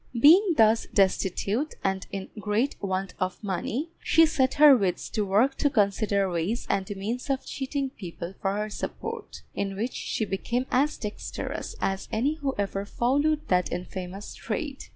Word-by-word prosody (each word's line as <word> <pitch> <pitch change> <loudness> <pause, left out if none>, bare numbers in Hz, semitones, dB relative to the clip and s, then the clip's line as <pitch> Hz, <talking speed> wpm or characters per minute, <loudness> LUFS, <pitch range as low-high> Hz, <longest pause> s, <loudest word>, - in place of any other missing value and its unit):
Being 340 - +7
thus 225 0 +4
destitute, 200 - +1
and 190 -1 -1
in 195 -1 -5
great 210 +6 0
want 190 -1 -2
of 185 0 -1
money, 225 - -2
she 325 0 +5
set 265 -4 +1
her 295 -2 +9
wits 190 -6 0
to 215 - 0
work 210 +8 +3
to 290 - +2
consider 200 -3 +2
ways 180 +6 -1
and 195 -1 -1
means 225 +8 -4
of 270 -1 -1
cheating 270 0 -3
people 175 -5 -7
for 195 +1 0
her 210 0 -2
support, - - -6
in 195 -1 -2
which 230 +6 -2
she 220 - -2
became 235 +6 -1
as 290 +4 +2
dexterous 210 -1 -5
as 195 0 -2
any 275 +8 0
who 275 -3 -2
ever 200 -1 -1
followed 285 +8 +1
that 180 -1 +2
infamous 180 +2 -5
trade. 270 +5 -4
215 Hz, 160 wpm, -27 LUFS, 195-270 Hz, -, her